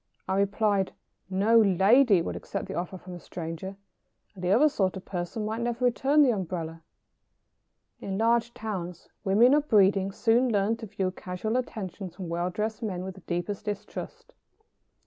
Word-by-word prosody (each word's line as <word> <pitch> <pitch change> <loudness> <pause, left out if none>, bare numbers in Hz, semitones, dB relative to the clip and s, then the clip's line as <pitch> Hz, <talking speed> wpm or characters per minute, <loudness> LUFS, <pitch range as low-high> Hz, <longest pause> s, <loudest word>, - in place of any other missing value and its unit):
I 190 - 0
replied: 200 -1 +1 0.4
"No 205 +5 +4
lady 200 +1 +5
would - - -4
accept - - -5
the - - -5
offer 180 +2 -4
from 180 0 -10
a 175 - -7
stranger, 170 +3 -6 0.6
and 185 -3 -11
the 180 - 0
other 240 +11 +6
sort 190 -10 0
of 185 - -10
person 180 +4 -4
might 220 +2 -3
never 240 +1 -1
return 275 +5 +4
the 260 - +4
umbrella." 165 -5 -4 1.2
In 195 -1 -4
large 230 +1 +2
towns 180 -6 -5
women 220 +6 +5
of 300 0 +2
breeding 195 -2 +4
soon 235 +5 +2
learn 205 +1 +2
to 225 -1 -8
view 190 -1 -2
casual 185 +5 -4
attentions 195 -7 -4
from 185 -3 -6
well 175 +1 -1
dressed 215 +4 -3
men 185 -5 -3
with 190 0 -5
the 190 - -15
deepest 175 +4 -4
distrust. 210 - -6
200 Hz, 165 wpm, -27 LUFS, 185-225 Hz, 1.2 s, other